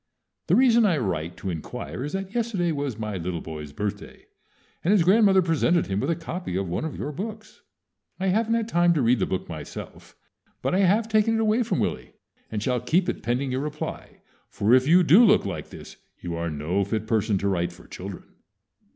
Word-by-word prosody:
The -, -, +4 dB
reason 240 Hz, -2 st, +5 dB
I 185 Hz, -7 st, +3 dB
write 90 Hz, -, -3 dB
to 95 Hz, -, -4 dB
inquire 80 Hz, -, -6 dB
is 150 Hz, -, -5 dB
that 195 Hz, +1 st, -4 dB
yesterday 220 Hz, -8 st, 0 dB
was 140 Hz, -6 st, -3 dB
my 105 Hz, -3 st, -4 dB
little 85 Hz, 0 st, -3 dB
boy's 75 Hz, -3 st, -8 dB
birthday, 100 Hz, +5 st, -6 dB, 0.6 s
and 175 Hz, -, +2 dB
his 205 Hz, -5 st, +5 dB
grandmother 195 Hz, 0 st, +5 dB
presented 170 Hz, +1 st, +2 dB
him 95 Hz, +1 st, -2 dB
with 135 Hz, -, -1 dB
a 170 Hz, -, +2 dB
copy 165 Hz, -, -5 dB
of 95 Hz, 0 st, -1 dB
one 90 Hz, -, -2 dB
of 160 Hz, -, -5 dB
your 150 Hz, -, -4 dB
books. 215 Hz, +6 st, -7 dB, 0.6 s
I 190 Hz, 0 st, 0 dB
haven't 225 Hz, +4 st, +1 dB
had 230 Hz, -1 st, -1 dB
time 175 Hz, -4 st, +3 dB
to 150 Hz, -, +1 dB
read 120 Hz, 0 st, +3 dB
the -, -, 0 dB
book 95 Hz, -, -3 dB
myself; 80 Hz, -3 st, -9 dB, 0.5 s
but -, -, 0 dB
I 185 Hz, -, +2 dB
have 200 Hz, +4 st, +3 dB
taken 220 Hz, +1 st, +2 dB
it -, -, 0 dB
away 220 Hz, +2 st, +2 dB
from 235 Hz, -, -1 dB
Willie, -, -, -2 dB, 0.4 s
and 105 Hz, -2 st, -3 dB
shall 125 Hz, 0 st, 0 dB
keep 170 Hz, +9 st, +1 dB
it -, -, -3 dB
pending 125 Hz, +5 st, -1 dB
your 130 Hz, +1 st, -1 dB
reply, 150 Hz, +1 st, -6 dB, 0.3 s
for 105 Hz, +4 st, +1 dB
if 130 Hz, +1 st, +5 dB
you 180 Hz, +3 st, +6 dB
do 180 Hz, +8 st, +7 dB
look 215 Hz, -, +5 dB
like 90 Hz, -6 st, -5 dB
this, -, -, -11 dB, 0.2 s
you 85 Hz, -, -5 dB
are 85 Hz, 0 st, -2 dB
no 80 Hz, +6 st, -1 dB
fit 110 Hz, +2 st, -2 dB
person 110 Hz, -2 st, +1 dB
to 100 Hz, -, -1 dB
write 90 Hz, -3 st, 0 dB
for 85 Hz, -, -16 dB
children. 95 Hz, 0 st, -8 dB
140 Hz, 210 wpm, -25 LUFS, -, 0.6 s, do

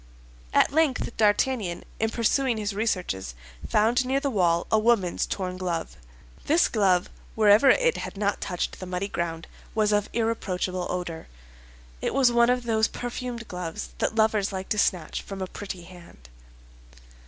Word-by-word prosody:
At -, -, +4 dB
length 285 Hz, -6 st, +1 dB
D'Artagnan, 210 Hz, -3 st, +1 dB, 0.2 s
in 220 Hz, -, +1 dB
pursuing 235 Hz, +2 st, +1 dB
his 210 Hz, -1 st, -2 dB
researches, 180 Hz, -, -2 dB, 0.3 s
found 230 Hz, +4 st, +3 dB
near 265 Hz, +2 st, +1 dB
the 280 Hz, -1 st, -1 dB
wall 170 Hz, -5 st, +2 dB
a 220 Hz, -, +5 dB
woman's 215 Hz, -6 st, +2 dB
torn 185 Hz, -2 st, -3 dB
glove. 175 Hz, -3 st, -3 dB, 0.5 s
This 320 Hz, +4 st, +4 dB
glove, 190 Hz, -5 st, +2 dB, 0.3 s
wherever 215 Hz, +4 st, +6 dB
it -, -, +4 dB
had -, -, -6 dB
not 205 Hz, 0 st, -1 dB
touched 180 Hz, -2 st, -3 dB
the 185 Hz, -, -7 dB
muddy 180 Hz, +2 st, -2 dB
ground, 165 Hz, -3 st, -3 dB, 0.3 s
was 215 Hz, -1 st, +2 dB
of 210 Hz, 0 st, +1 dB
irreproachable 185 Hz, -5 st, -1 dB
odor. 175 Hz, -3 st, -4 dB, 0.7 s
It -, -, -2 dB
was 260 Hz, -3 st, +5 dB
one 235 Hz, 0 st, +4 dB
of 250 Hz, 0 st, +1 dB
those 220 Hz, -1 st, +2 dB
perfumed 245 Hz, -1 st, -5 dB
gloves 180 Hz, -3 st, -5 dB
that -, -, 0 dB
lovers 220 Hz, -2 st, +2 dB
like 190 Hz, -1 st, -5 dB
to 210 Hz, -, 0 dB
snatch 175 Hz, -6 st, 0 dB
from 195 Hz, -1 st, -8 dB
a 190 Hz, -, -2 dB
pretty 185 Hz, -1 st, -7 dB
hand. 170 Hz, -, -15 dB
205 Hz, 155 wpm, -26 LUFS, 180-235 Hz, 0.7 s, wherever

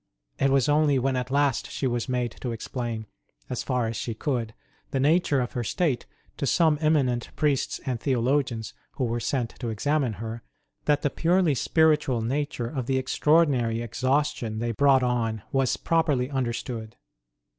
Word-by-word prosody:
It 135 Hz, -, +3 dB
was 135 Hz, -2 st, +3 dB
only 150 Hz, -1 st, +3 dB
when 130 Hz, +1 st, +1 dB
at 125 Hz, 0 st, -2 dB
last 140 Hz, -2 st, +1 dB
she -, -, -3 dB
was 120 Hz, 0 st, -1 dB
made 125 Hz, -1 st, 0 dB
to 125 Hz, -, -2 dB
explain, 115 Hz, -1 st, -4 dB, 0.5 s
as 125 Hz, -, -2 dB
far 125 Hz, -3 st, 0 dB
as 115 Hz, -, -3 dB
she 115 Hz, +1 st, -3 dB
could, 115 Hz, -4 st, -2 dB, 0.3 s
the 135 Hz, -, -1 dB
nature 150 Hz, 0 st, +3 dB
of 125 Hz, -1 st, -2 dB
her 120 Hz, -, -3 dB
state 130 Hz, -, -1 dB, 0.3 s
to 140 Hz, -, -1 dB
some 160 Hz, 0 st, +3 dB
eminent 135 Hz, -6 st, +1 dB
priests 145 Hz, -3 st, 0 dB
and 125 Hz, -3 st, -2 dB
theologians 125 Hz, -2 st, 0 dB, 0.2 s
who 135 Hz, -, -3 dB
were 120 Hz, -1 st, 0 dB
sent 120 Hz, -1 st, -1 dB
to 120 Hz, -, -3 dB
examine 135 Hz, +3 st, 0 dB
her, 115 Hz, +3 st, -6 dB, 0.4 s
that 150 Hz, -1 st, +2 dB
the 145 Hz, -, +1 dB
purely 170 Hz, -1 st, +2 dB
spiritual 150 Hz, -3 st, +2 dB
nature 135 Hz, 0 st, -2 dB
of 130 Hz, -2 st, -4 dB
the 135 Hz, -, +1 dB
extraordinary 130 Hz, -4 st, +2 dB
exhaustion 125 Hz, -1 st, -1 dB
they 120 Hz, +1 st, -1 dB
brought 135 Hz, +2 st, +4 dB
on 115 Hz, -4 st, 0 dB
was 135 Hz, -3 st, +1 dB
properly 150 Hz, -6 st, +1 dB
understood. 120 Hz, -3 st, -3 dB
130 Hz, 165 wpm, -26 LUFS, 120-145 Hz, 0.5 s, brought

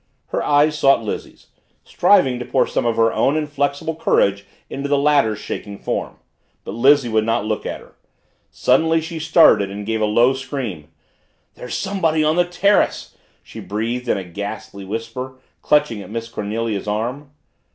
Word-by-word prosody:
Her -, -, -1 dB
eyes 150 Hz, +1 st, +2 dB
sought 135 Hz, -4 st, +4 dB
Lizzie's, 105 Hz, -, -7 dB, 0.3 s
striving 135 Hz, -12 st, +3 dB
to 125 Hz, -, -5 dB
pour -, -, +2 dB
some -, -, -1 dB
of 115 Hz, -, +1 dB
her 115 Hz, 0 st, +2 dB
own 145 Hz, +3 st, +2 dB
inflexible 145 Hz, +1 st, -2 dB
courage 100 Hz, -10 st, +1 dB, 0.2 s
into 140 Hz, +1 st, -5 dB
the 145 Hz, -, +3 dB
latter's 140 Hz, -7 st, +2 dB
quaking 100 Hz, -1 st, -6 dB
form. -, -, -4 dB, 0.5 s
But -, -, -7 dB
Lizzie 135 Hz, +3 st, +4 dB
would 110 Hz, -1 st, +1 dB
not 115 Hz, -1 st, 0 dB
look 110 Hz, -1 st, -3 dB
at -, -, -5 dB
her. -, -, -18 dB, 0.6 s
Suddenly 160 Hz, +6 st, +2 dB
she 165 Hz, 0 st, -6 dB
started 110 Hz, -, +5 dB
and 100 Hz, +1 st, -7 dB
gave 110 Hz, 0 st, -2 dB
a -, -, +3 dB
low 120 Hz, +5 st, +3 dB
scream; 130 Hz, -, -5 dB, 0.7 s
"There's 125 Hz, -, -7 dB
somebody 165 Hz, -6 st, 0 dB
on 155 Hz, +1 st, +2 dB
the 175 Hz, 0 st, +3 dB
terrace!" 200 Hz, +3 st, +1 dB, 0.3 s
she -, -, -11 dB
breathed 115 Hz, +5 st, -3 dB
in -, -, +2 dB
a 95 Hz, -, -4 dB
ghastly 100 Hz, +2 st, -7 dB
whisper, 115 Hz, +5 st, -6 dB, 0.2 s
clutching 150 Hz, -8 st, +2 dB
at -, -, -11 dB
Miss 115 Hz, +1 st, -5 dB
Cornelia's 105 Hz, -1 st, -3 dB
arm. 120 Hz, +7 st, -3 dB
125 Hz, 165 wpm, -20 LUFS, 110-150 Hz, 0.7 s, started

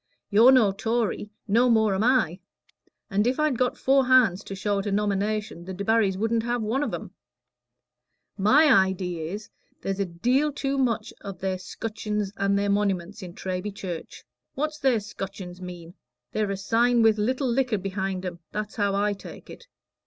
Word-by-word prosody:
You're 225 Hz, +6 st, +7 dB
no 240 Hz, -7 st, +5 dB
Tory; 225 Hz, +1 st, -1 dB, 0.2 s
no 235 Hz, +5 st, +4 dB
more 220 Hz, -3 st, +3 dB
am 190 Hz, +2 st, 0 dB
I. 220 Hz, -8 st, +2 dB, 0.7 s
And 205 Hz, +3 st, +2 dB
if 255 Hz, +4 st, 0 dB
I'd 305 Hz, -5 st, +1 dB
got 255 Hz, 0 st, +1 dB
four 270 Hz, -1 st, +3 dB
hands 225 Hz, -7 st, +4 dB
to 195 Hz, -, -6 dB
show 200 Hz, +1 st, -1 dB
at 195 Hz, -, -4 dB
a -, -, -1 dB
nomination, 205 Hz, -2 st, -1 dB
the 190 Hz, 0 st, -6 dB
Debarrys 200 Hz, -1 st, +1 dB
shouldn't 225 Hz, +1 st, +1 dB
have 240 Hz, 0 st, -1 dB
one 230 Hz, +6 st, 0 dB
of 290 Hz, -, -1 dB
'em. -, -, -6 dB, 1.2 s
My 220 Hz, 0 st, +5 dB
idee 180 Hz, -2 st, -3 dB
is, 200 Hz, +7 st, -6 dB, 0.3 s
there's 195 Hz, 0 st, -2 dB
a 200 Hz, -, +1 dB
deal 250 Hz, -, +1 dB
too 275 Hz, -1 st, -2 dB
much 245 Hz, -4 st, 0 dB
of 195 Hz, -2 st, -7 dB
their 190 Hz, -1 st, -2 dB
scutchins 210 Hz, 0 st, -4 dB
and 200 Hz, 0 st, +1 dB
their 200 Hz, 0 st, +1 dB
moniments 200 Hz, -1 st, -1 dB
in 180 Hz, -1 st, -9 dB
Treby 190 Hz, +2 st, -4 dB
Church. 175 Hz, -5 st, -7 dB, 0.3 s
What's 305 Hz, +2 st, -2 dB
their 260 Hz, -4 st, +3 dB
scutchins 195 Hz, -3 st, -7 dB
mean? 175 Hz, -2 st, -9 dB, 0.4 s
They're 215 Hz, -2 st, -1 dB
a 195 Hz, -, -2 dB
sign 235 Hz, +4 st, +2 dB
with 220 Hz, -1 st, +4 dB
little 255 Hz, +5 st, 0 dB
liquor 245 Hz, -2 st, +1 dB
behind 190 Hz, -1 st, -3 dB
'em; 175 Hz, -1 st, -5 dB
that's 210 Hz, +1 st, -5 dB
how 200 Hz, -2 st, +1 dB
I 205 Hz, +1 st, +1 dB
take 200 Hz, -, -11 dB
it. 485 Hz, -, -13 dB
210 Hz, 175 wpm, -26 LUFS, 195-240 Hz, 1.2 s, You're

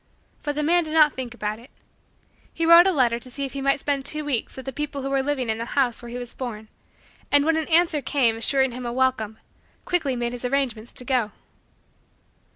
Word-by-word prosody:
But 290 Hz, -1 st, -3 dB
the 300 Hz, -, -1 dB
man 345 Hz, +3 st, +3 dB
did 310 Hz, 0 st, -5 dB
not 305 Hz, -2 st, +6 dB
think 245 Hz, -2 st, -6 dB
about 215 Hz, -1 st, -3 dB
it. 240 Hz, -, -16 dB, 0.8 s
He 330 Hz, -, -2 dB
wrote 335 Hz, +2 st, +8 dB
a -, -, +4 dB
letter 245 Hz, -7 st, +2 dB
to 255 Hz, -, -9 dB
see 275 Hz, +2 st, -4 dB
if 270 Hz, -, -7 dB
he 275 Hz, -, -4 dB
might 275 Hz, +1 st, +2 dB
spend 280 Hz, -1 st, -1 dB
two 305 Hz, +2 st, -3 dB
weeks 265 Hz, -4 st, -2 dB
with 260 Hz, -, -8 dB
the 270 Hz, -, -5 dB
people 290 Hz, 0 st, -4 dB
who 275 Hz, -, -3 dB
were 275 Hz, -1 st, +2 dB
living 265 Hz, -3 st, -1 dB
in 220 Hz, 0 st, -1 dB
the 230 Hz, -, -3 dB
house 250 Hz, -4 st, +2 dB
where 240 Hz, -, -9 dB
he 240 Hz, -, -6 dB
was 245 Hz, -1 st, -7 dB
born 220 Hz, -4 st, -6 dB, 0.6 s
and, 285 Hz, 0 st, +5 dB
when 325 Hz, -, +3 dB
the 320 Hz, -1 st, -2 dB
answer 330 Hz, -2 st, +4 dB
came 250 Hz, -4 st, +1 dB
assuring 265 Hz, +3 st, +2 dB
him 245 Hz, 0 st, -6 dB
a -, -, -2 dB
welcome, 240 Hz, -4 st, 0 dB, 0.5 s
quickly 320 Hz, -7 st, 0 dB
made 240 Hz, 0 st, -2 dB
his 245 Hz, -, -7 dB
arrangements 250 Hz, -3 st, -1 dB
to 250 Hz, -, -9 dB
go. 245 Hz, -5 st, +1 dB
265 Hz, 230 wpm, -24 LUFS, 240-290 Hz, 0.8 s, wrote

